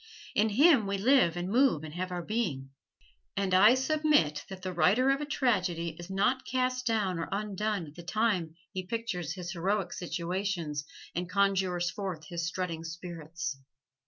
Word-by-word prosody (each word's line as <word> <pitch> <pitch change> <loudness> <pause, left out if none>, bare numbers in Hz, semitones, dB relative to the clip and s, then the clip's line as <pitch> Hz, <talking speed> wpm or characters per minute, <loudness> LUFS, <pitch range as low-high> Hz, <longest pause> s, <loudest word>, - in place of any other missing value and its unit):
In 215 +1 +3
Him 265 -1 +5
we 200 0 -1
live 215 -6 +4
and 175 +1 -2
move 235 - +3
and 155 -1 -7
have 185 +2 -3
our 175 -1 -3
being. 165 - -2 0.7
And 195 -2 0
I 210 +6 +7
submit 265 - +2
that 190 -1 -8
the 185 -1 -3
writer 215 +10 +4
of 275 +1 0
a 295 - -3
tragedy 185 - +1
is 175 +1 -8
not 205 +7 +1
cast 255 0 -1
down 205 -6 +1
or 165 - -3
undone 205 -1 -1
at 145 - -12
the 175 - -10
time 180 -3 0 0.2
he 185 - -2
pictures 180 -8 -3
his 175 -2 -5
heroic 190 +1 -1
situations 175 -4 -3 0.3
and 175 +1 -3
conjures 190 -3 +1
forth 180 -7 -5
his 170 -1 -2
strutting 175 -2 -3
spirits. 165 -3 -6
185 Hz, 165 wpm, -30 LUFS, 170-220 Hz, 0.7 s, I